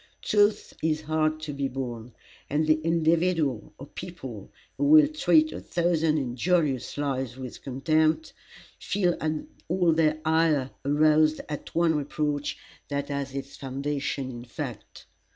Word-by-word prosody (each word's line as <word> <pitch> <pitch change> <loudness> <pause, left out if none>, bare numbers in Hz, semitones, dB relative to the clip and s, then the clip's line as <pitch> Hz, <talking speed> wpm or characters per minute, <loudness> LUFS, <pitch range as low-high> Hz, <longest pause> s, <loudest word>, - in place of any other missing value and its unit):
Truth 205 0 +2
is 155 -1 0
hard 155 0 0
to 155 -1 -5
be 140 -1 -1
borne, 125 -3 -6 0.4
and 150 +2 +1
the 155 0 +3
individual, 165 -5 +1
or 140 - -9
people, 135 - -8 0.2
who 290 - 0
will 305 0 +8
treat 310 +1 +3
a - - -6
thousand 165 -3 +1
injurious 140 +1 0
lies 135 -3 -2
with 130 -2 -8
contempt, 155 - +1 0.5
feel 180 -4 +1 0.5
all 175 -1 +3
their 155 -1 +2
ire 160 -4 +2
aroused 155 +2 +3
at 150 -2 -7
one 170 -1 +3
reproach 145 0 -2 0.3
that 140 0 -3
has 140 -1 -3
its 140 0 -6
foundation 140 0 -3
in 120 -1 -8
fact. 120 - -8
155 Hz, 135 wpm, -27 LUFS, 135-165 Hz, 0.5 s, will